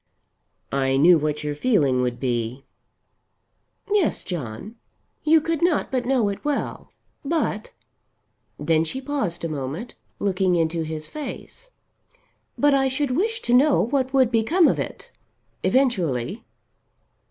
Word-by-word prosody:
"I 135 -1 +1
knew 165 +4 +6
what 150 0 -2
your 150 0 -2
feeling 145 - +2
would 125 -1 -2
be." 120 +1 -2 1.3
"Yes, 405 -6 +1
John. 175 - -6 0.5
You 315 +1 +5
could 325 0 -2
not 345 -3 +1
but 255 -2 -1
know 255 -5 +2
it 200 - -6
well. 295 -1 -3 0.3
But 285 -8 -1 0.4
" - - -47
Then 160 -1 +4
she 210 +11 -4
paused 265 - -3
a - - 0
moment, 155 - -5 0.2
looking 190 -2 +1
into 165 0 0
his 155 -1 -5
face. 305 - -8 0.9
"But 290 0 +4
I 270 -1 +3
should 265 +1 -1
wish 445 - -1
to 240 - 0
know 275 +3 +5
what 260 +2 0
would 260 -3 +3
become 295 +10 +3
of - - +1
it - - -6 0.5
eventually." 195 - 0
215 Hz, 135 wpm, -23 LUFS, -, 1.3 s, knew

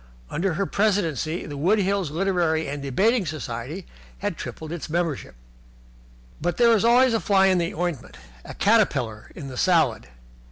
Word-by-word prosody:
Under 175 0 -1
her 195 - 0
presidency 180 - 0
the 145 - -7
Wood 185 +9 +3
Hills 195 -4 0
Literary 170 -1 0
and 145 +1 -4
Debating 200 - +2
Society 150 +2 -5 0.3
had 205 -3 -3
tripled 160 0 -7
its 170 -2 -6
membership. 165 -3 -2 1.1
But 175 +2 -1
there 235 -1 +5
is 215 - +1
always 245 +1 +5
a 225 - +2
fly 195 -2 +3
in 185 -2 +3
the 170 -1 -2
ointment, 170 -6 -4 0.3
a - - -9
caterpillar 140 - +1
in 140 - -7
the 130 -2 -8
salad. 160 - +2
175 Hz, 160 wpm, -24 LUFS, 150-200 Hz, 1.1 s, there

